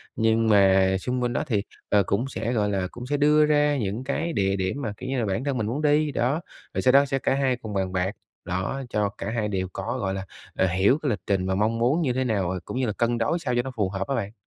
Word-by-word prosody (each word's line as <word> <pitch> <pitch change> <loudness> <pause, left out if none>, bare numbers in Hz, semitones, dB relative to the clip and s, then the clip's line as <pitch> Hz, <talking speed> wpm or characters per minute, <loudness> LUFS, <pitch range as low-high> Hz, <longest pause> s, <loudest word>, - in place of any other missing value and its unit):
Nhưng 115 0 +2
mà 95 -2 +5
xung 125 +4 -2
quanh 120 0 0
đó - - 0
thì, 105 -3 0 0.3
ờ, 100 -1 +4
cũng 100 +8 0
sẽ, 120 -2 -3
gọi 105 -3 +1
là, 95 -2 -1
cũng 120 - -8
sẽ 145 +2 0
đưa 150 +1 +5
ra 150 -1 +3
những 110 0 -2
cái 160 +5 -2
địa 95 -3 +1
điểm 95 +9 -2
mà, 110 -6 -3
kiểu 130 - -6
như 135 -1 0
là, 115 - 0
bản 100 +4 -1
thân 140 -2 -1
mình 110 -3 -1
muốn 130 +7 -2
đi. 150 0 +3
Đó, 135 +5 0 0.3
rồi - - -1
sau 130 - +4
đó 140 +2 +6
sẽ 135 -1 -1
cả - - +1
hai 135 -2 +1
cùng 110 -4 -8
bàn 95 -1 -1
bạc. 95 +1 0 0.3
Đó, 95 +10 -2
cho 105 -2 0
cả 100 - -4
hai 110 -2 -1
đều 95 -2 -2
có, 120 +3 -3
gọi 95 -4 -1
là, 95 0 -4 0.3
ờ, 95 - +2
hiểu 95 +9 +3
cái 145 - 0
lịch 105 - -1
trình 95 -2 +1
và 95 - 0
mong 110 +3 +1
muốn 130 +9 +2
như 135 -6 +1
thế 130 +1 0
nào 95 -6 -1
cũng - - -5
như 130 - +1
là 105 - -1
cân 120 +2 0
đối 115 +10 0
sao 130 -6 -2
cho 120 - +3
nó 130 +2 -6
phù 105 -4 0
hợp 95 0 -3
đó 135 - +1
bạn. 100 -4 -3
115 Hz, 285 wpm, -25 LUFS, 100-135 Hz, 0.3 s, đó